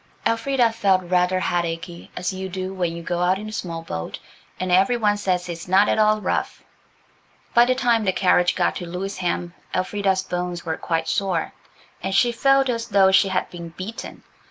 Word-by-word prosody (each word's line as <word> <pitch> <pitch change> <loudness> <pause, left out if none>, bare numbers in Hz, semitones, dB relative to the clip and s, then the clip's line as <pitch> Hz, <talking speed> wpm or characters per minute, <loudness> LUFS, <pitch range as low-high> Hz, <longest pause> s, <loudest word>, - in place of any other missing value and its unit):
Elfrida 235 +1 +2
felt 195 -4 +2
rather 180 +1 +2
headachy, 170 0 -3
as 180 +2 -2
you 190 0 -5
do 185 +1 -4
when 175 -3 -2
you 170 - -7
go 175 +1 -2
out 180 +2 +2
in 210 +2 -7
a - - -6
small 165 -5 -5
boat 80 - -5 0.4
and 185 0 -2
every 195 +7 +4
one 210 -2 +2
says 185 -3 -1
it - - -4
is 170 +1 -8
not 195 +3 +4
at - - +1
all 215 0 +4
rough. - - -2 0.9
By 240 0 +6
the 255 +1 +2
time 235 -3 +2
the 190 - +2
carriage 180 -1 +3
got 175 - +1
to 175 - -6
Lewisham 180 -1 -3 0.2
Elfrida's 190 0 0
bones 180 -1 -4
were 160 -1 -1
quite 165 -1 -2
sore, 185 -5 -1 0.5
and 190 +1 -2
she 240 - +4
felt 270 +3 +3
as 230 -2 -2
though 195 -3 +4
she 190 - +5
had 190 -1 -1
been 170 -1 -8
beaten. 185 +7 -8
185 Hz, 195 wpm, -23 LUFS, 175-210 Hz, 0.9 s, By